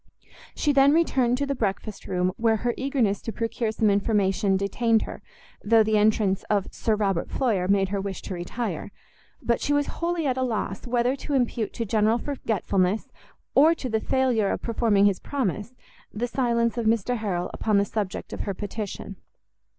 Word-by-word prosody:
She 295 - +1
then 275 +1 +5
returned 260 -7 +2
to 285 - 0
the 280 - -1
breakfast 210 -3 -3
room, 180 0 0
where 225 -1 +3
her 240 - +2
eagerness 260 -7 0
to 225 - -4
procure 230 0 -2
some 220 -1 +2
information 200 -1 +1
detained 220 +3 +1
her, - - -8 0.4
though 225 +1 +5
the 215 0 +1
entrance 210 -2 +2
of 205 -2 -1
Sir 220 - 0
Robert 195 -5 -1
Floyer 210 -9 0
made 195 -1 +2
her 200 0 -1
wish 195 -1 -5
to - - -5
retire. 180 +7 -4 0.5
But 235 - +1
she 290 - +1
was 290 0 +2 0.2
wholly 340 -1 0
at 260 -2 0
a - - 0
loss 220 -4 -2
whether 245 +2 +1
to 285 +1 -3
impute 240 -4 0
to 230 - -3
general 220 +2 +2
forgetfulness, 215 -7 -1 0.4
or 315 +4 +6
to 260 - -5
the 220 -1 +1
failure 250 -6 +1
of - - -3
performing 220 -4 +2
his 200 -2 +2
promise, 240 -3 -3 0.4
the 225 +4 -2
silence 235 -1 0
of 225 - 0
Mr 230 +2 +1
Harrel 185 -5 -2
upon 215 -2 +1
the 200 - +3
subject 205 -3 -4
of - - -6
her 200 - -3
petition. 200 -1 -6
220 Hz, 180 wpm, -25 LUFS, 200-245 Hz, 0.5 s, or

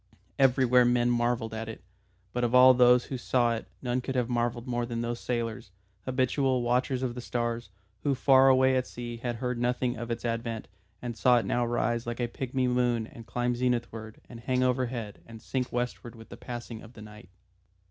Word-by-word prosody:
Everywhere 125 -2 +5
men 120 0 +3
marvelled 120 -2 0
at 110 0 -5
it, 110 - -9 0.5
but 125 - -1
of 120 +1 +1
all 130 +1 +9
those 125 0 +5
who 130 - -5
saw 120 -2 +2
it 115 - -5 0.2
none 125 0 0
could 130 +1 -4
have 125 -1 0
marvelled 120 0 -1
more 120 -2 -1
than 120 -1 -3
those 120 0 -3
sailors, 115 -4 -3 0.4
habitual 130 0 +1
watchers 125 +2 0
of 125 -2 -1
the 125 - -6
stars, 120 -2 -3 0.3
who 140 -2 +1
far 135 +1 +5
away 130 0 +4
at 130 0 0
sea 120 -1 -7
had 120 0 -3
heard 125 +1 -3
nothing 125 0 0
of 120 0 -6
its 115 0 -3
advent 115 -1 -3 0.4
and 120 -1 -4
saw 120 +4 +4
it 115 - 0
now 120 +5 +1
rise 120 0 -1
like 120 0 -4
a 120 - 0
pigmy 130 +1 -2
moon 125 -2 +1
and 115 0 -13
climb 120 0 -1
zenithward 120 -3 -2
and 120 - -10
hang 125 +2 0
overhead 125 -4 -2
and 115 -1 -10
sink 125 +2 -3
westward 120 -1 -3
with 115 0 -13
the - - -9
passing 120 -2 -7
of 115 +2 -13
the 105 - -11
night. 105 -3 -13
120 Hz, 200 wpm, -28 LUFS, 115-125 Hz, 0.5 s, all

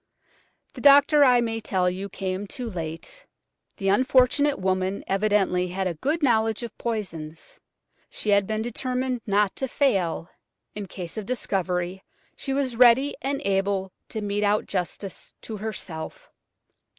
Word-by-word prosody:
The - - -9
doctor, 285 +1 +7
I 250 -3 +6
may 225 -1 -1
tell 190 -4 0
you, 190 +2 -2
came 190 +1 -4
too 245 +4 -5
late. 175 - -6 0.5
The 195 -1 0
unfortunate 260 +6 +3
woman 185 +1 -1
evidently 195 -2 +1
had 190 +2 -3
a 180 - 0
good 290 - -1
knowledge 225 -3 +2
of 235 - -7
poisons. 200 - -5 0.5
She 210 - -2
had 200 -1 +4
been 220 0 -1
determined 250 +1 -2
not 205 -1 +2
to 265 - -1
fail; 195 - +1 0.5
in 205 -2 -6
case 180 +1 -7
of 210 -2 -4
discovery, 190 -6 -2 0.3
she 270 - -5
was 270 -3 0
ready 250 +4 +6
and 275 +1 -2
able 195 -1 0 0.2
to 220 - -4
mete 205 0 -1
out 205 +1 +2
justice 185 +2 -4
to 220 - -6
herself. 190 -6 -6
210 Hz, 145 wpm, -25 LUFS, 190-250 Hz, 0.5 s, doctor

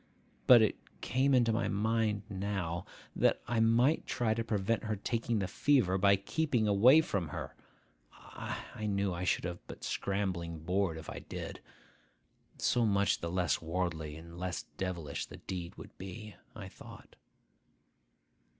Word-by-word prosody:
But 120 -3 +9
it 110 - +1 0.2
came 130 +2 +2
into 120 -3 +4
my 115 - 0
mind 110 0 0
now, 95 -3 -3 0.3
that - - +3
I 120 0 0
might 120 +7 +3
try 115 -3 +1
to 115 +1 -2
prevent 110 +1 0
her 110 -1 -1
taking 115 +3 -1
the 95 -2 -1
fever 110 -1 +2
by 100 +1 +6
keeping 120 +3 0
away 120 +10 +7
from 100 - -2
her. - - -6 0.7
I 110 - -6
knew 100 -2 0
I 90 +1 -3
should - - +1
have 90 -1 -4
but - - -10
scrambling 95 -4 -2
board 90 -1 0
if 80 - -9
I - - -6
did; - - -7 1.0
so 120 - +2
much 100 -3 +2
the 85 - -3
less 90 -1 0
worldly 80 -3 -2
and 85 +2 -11
less 90 -2 -3
devilish 85 -6 -3
the - - -10
deed 90 -2 -6
would - - -12
be, 100 +2 -8 0.2
I 105 -3 -7
thought. - - -13
100 Hz, 150 wpm, -32 LUFS, 90-115 Hz, 1.0 s, But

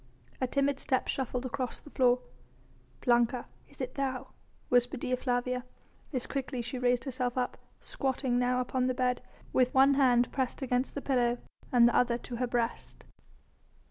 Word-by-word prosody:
A 255 - +2
timid 275 +1 +1
step 260 -1 0
shuffled 260 -1 -2
across 255 -1 -3
the 290 - -15
floor. 250 -1 +3 0.8
"Blanca, 240 0 +3 0.2
is 280 - -18
it 255 -1 -3
thou?" 265 -2 -2 0.4
whispered 245 +1 +2
Dea 255 - +1
Flavia, 250 0 -1 0.5
as 255 -4 -2
quickly 270 -2 -3
she 245 +2 -4
raised 245 -1 +2
herself 255 -2 -2
up, 250 -1 0 0.3
squatting 260 -2 -1
now 250 0 +2
upon 255 0 0
the 255 - 0
bed, 250 -1 +1 0.3
with 255 -1 +3
one 270 +1 +7
hand 250 -3 +4
pressed 265 +1 -2
against 250 0 0
the 285 - -3
pillow 245 -3 +2 0.3
and 240 -2 +7
the 240 - +1
other 240 -1 +3
to 240 0 -7
her 250 +1 0
breast. 235 -1 -2
250 Hz, 165 wpm, -30 LUFS, 245-265 Hz, 0.8 s, one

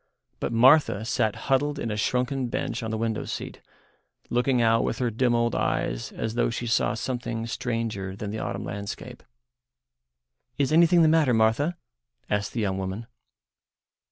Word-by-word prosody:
But - - -2
Martha 120 -2 +5
sat 110 -2 0
huddled 145 +2 +1
in 115 - -3
a - - -2
shrunken 125 +4 0
bunch - - -3
on 110 - -4
the 110 - -2
window 110 -1 -1
seat, - - -6 0.7
looking 125 +1 +2
out 115 -1 +3
with - - -1
her 125 -2 0
dim 120 +2 +2
old 120 -1 +1
eyes - - -1
as 110 - -3
though 120 - +1
she 120 +1 -4
saw 115 - +1
something 120 -1 -3
stranger 115 -5 -3
than 100 0 -5
the 110 - -4
autumn 100 +1 -4
landscape. 105 +5 -6 1.4
"Is 145 +1 +1
anything 170 +1 +6
the - - +6
matter, 155 -6 +4
Martha?" 115 +10 +2 0.5
asked 105 0 -1
the 115 - -1
young 95 -2 -1
woman. 95 +4 -4
115 Hz, 160 wpm, -26 LUFS, 110-130 Hz, 1.4 s, anything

